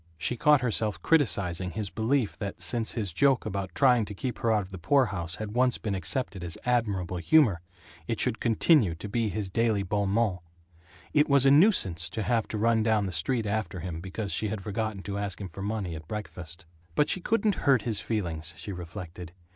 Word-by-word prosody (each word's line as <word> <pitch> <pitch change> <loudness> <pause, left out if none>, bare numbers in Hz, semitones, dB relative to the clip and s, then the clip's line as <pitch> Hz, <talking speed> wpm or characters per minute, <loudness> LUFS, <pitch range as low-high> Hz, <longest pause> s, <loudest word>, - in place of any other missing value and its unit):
She 105 +9 0
caught 150 +3 +4
herself 110 -3 -1
criticizing 95 - +2
his 105 -2 -4
belief 115 0 0
that, 100 -1 -5
since 115 -2 0
his 100 -7 -3
joke 135 +6 +3
about 100 -3 -4
trying 125 -4 +4
to 105 - -8
keep 125 +4 -4
her 115 - +1
out 105 -2 +2
of 95 - -13
the 95 - -8
poorhouse 95 - +1
had 110 0 -6
once 125 0 +2
been 105 - -3
accepted 100 0 -2
as 85 -1 -4
admirable 100 -8 0
humor, 105 - +4 0.5
it 115 - -2
should 125 -3 +1
continue 115 - +3
to 85 - -7
be 110 +1 -1
his 100 +1 -3
daily 110 -2 +1
bon 100 +1 -1
mot. 100 -4 +1 0.7
It 150 0 +3
was 140 -1 +5
a 135 - +6
nuisance 140 - +4
to 110 - -3
have 115 -1 0
to 110 - -4
run 115 +1 +2
down 110 -2 +2
the 95 - -3
street 110 +8 0
after 100 -4 -2
him 85 -1 -5
because 95 +2 -4
she 110 - +1
had 105 -2 -4
forgotten 105 -1 -3
to 100 0 -4
ask 100 -3 -3
him 95 -2 -6
for 95 - -9
money 100 -3 -3
at 80 0 -9
breakfast. 90 -3 -7 0.3
But 150 - +3
she 185 - 0
couldn't 220 +1 +1 0.2
"hurt 130 -6 +4
his 110 -4 0
feelings," 85 -8 -3
she 100 - -6
reflected. 90 -1 -8
105 Hz, 205 wpm, -28 LUFS, 95-120 Hz, 0.7 s, a